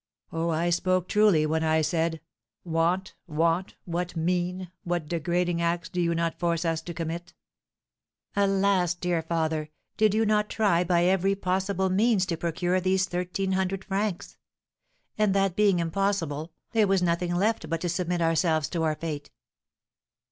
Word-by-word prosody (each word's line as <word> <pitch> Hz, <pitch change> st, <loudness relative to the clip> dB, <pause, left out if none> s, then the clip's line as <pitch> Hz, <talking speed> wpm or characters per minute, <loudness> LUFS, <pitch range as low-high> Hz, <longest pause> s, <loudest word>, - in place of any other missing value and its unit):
Oh, 165 Hz, +1 st, -1 dB
I 165 Hz, +2 st, +1 dB
spoke 185 Hz, +1 st, +1 dB
truly 210 Hz, -7 st, +4 dB
when 160 Hz, +1 st, 0 dB
I 160 Hz, 0 st, +3 dB
said, 165 Hz, 0 st, 0 dB, 0.4 s
'Want, 170 Hz, +3 st, 0 dB
want, 165 Hz, +3 st, 0 dB
what 180 Hz, +1 st, -3 dB
mean, 180 Hz, +2 st, -1 dB
what 175 Hz, -3 st, -2 dB
degrading 175 Hz, +1 st, 0 dB
acts 170 Hz, 0 st, -1 dB
do 180 Hz, -, -2 dB
you 170 Hz, -1 st, +1 dB
not 165 Hz, 0 st, -1 dB
force 170 Hz, -1 st, 0 dB
us 165 Hz, -1 st, 0 dB
to 170 Hz, +1 st, -7 dB
commit!'" 170 Hz, +1 st, -5 dB, 1.0 s
"Alas, 195 Hz, -3 st, +2 dB
dear 175 Hz, -1 st, -1 dB
father, 160 Hz, -2 st, -1 dB, 0.3 s
did 215 Hz, -1 st, +3 dB
you 220 Hz, 0 st, +3 dB
not 210 Hz, 0 st, +2 dB
try 195 Hz, -6 st, +2 dB
by 175 Hz, -1 st, +2 dB
every 190 Hz, +2 st, +2 dB
possible 190 Hz, 0 st, 0 dB
means 205 Hz, 0 st, +3 dB
to 175 Hz, -2 st, -2 dB
procure 175 Hz, +2 st, -1 dB
these 190 Hz, +1 st, +2 dB
thirteen 180 Hz, +2 st, -2 dB
hundred 190 Hz, 0 st, -1 dB
francs? 195 Hz, -2 st, -3 dB, 0.8 s
And, 210 Hz, -2 st, +3 dB
that 195 Hz, -2 st, +2 dB
being 205 Hz, -3 st, +4 dB
impossible, 165 Hz, -3 st, -1 dB, 0.2 s
there 220 Hz, -3 st, +3 dB
was 190 Hz, -1 st, +2 dB
nothing 175 Hz, 0 st, 0 dB
left 215 Hz, +5 st, 0 dB
but 165 Hz, 0 st, -2 dB
to 175 Hz, -, -1 dB
submit 175 Hz, 0 st, -1 dB
ourselves 160 Hz, -2 st, +2 dB
to 170 Hz, -, -2 dB
our 155 Hz, -1 st, +1 dB
fate." 150 Hz, -3 st, -5 dB
175 Hz, 155 wpm, -27 LUFS, 165-190 Hz, 1.0 s, truly